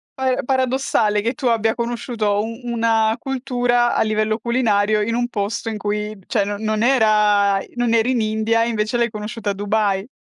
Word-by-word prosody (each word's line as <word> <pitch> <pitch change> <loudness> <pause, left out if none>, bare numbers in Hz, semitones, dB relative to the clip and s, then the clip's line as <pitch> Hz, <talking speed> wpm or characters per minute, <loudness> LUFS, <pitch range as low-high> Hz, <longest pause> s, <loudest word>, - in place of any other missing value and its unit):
para 260 -1 0
paradossale 255 -5 +1
che 235 +3 -1
tu 255 - -7
abbia 225 -1 +1
conosciuto 235 -3 -1
un 230 +2 -6
una 225 -2 +1
cultura 245 -2 0
a - - +2
livello 215 0 0
culinario 215 -3 +1
in 230 +2 -1
un 240 0 0
posto 225 +1 -3
in 220 - -4
cui 210 +1 -3
cioè, 215 -5 +1
no 205 0 -3
non 215 0 -1
era 210 -5 +3 0.2
non 240 -1 0
eri 230 +2 +2
in 245 -3 +1
India 220 +1 +1
e - - -1
invece 215 +1 -1
l'hai 235 0 +1
conosciuta 215 0 -4
a - - -3
Dubai. 205 0 -1
220 Hz, 180 wpm, -20 LUFS, 210-240 Hz, 0.2 s, era